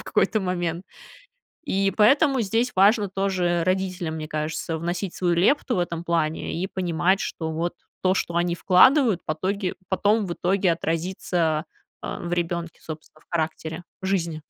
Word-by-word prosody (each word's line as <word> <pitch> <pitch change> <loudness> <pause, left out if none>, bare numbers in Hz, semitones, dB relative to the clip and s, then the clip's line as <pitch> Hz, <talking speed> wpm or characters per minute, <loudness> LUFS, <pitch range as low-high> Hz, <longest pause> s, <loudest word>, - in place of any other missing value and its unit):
в - - -9
какой-то 215 - +1
момент. 175 -2 -2 0.8
И 195 -6 +1
поэтому 270 +5 +4
здесь 225 +5 0
важно 205 +2 +4
тоже 185 -3 0
родителям, 185 -3 -1
мне 155 -1 -5
кажется, 155 +1 -3
вносить 175 +3 -3
свою 175 -2 +1
лепту 245 - +2
в - - 0
этом 170 -1 -2
плане 165 -2 -1
и 190 - 0
понимать, 185 0 0
что 160 -1 -3
вот 170 +2 -2 0.3
то, 185 0 +3
что 170 - -2
они 175 0 +1
вкладывают, 210 - +5
потоге 185 +5 -2
потом 205 +2 +2
в 175 - -3
итоге 185 0 +1
отразится, 165 -1 -1 0.4
а, - - -5
в 175 0 -5
ребёнке, 170 -1 -2
собственно, 155 -1 -10
в - - -58
характере, 160 0 -3 0.2
жизни. 170 -5 -1
175 Hz, 155 wpm, -24 LUFS, 165-195 Hz, 0.8 s, вкладывают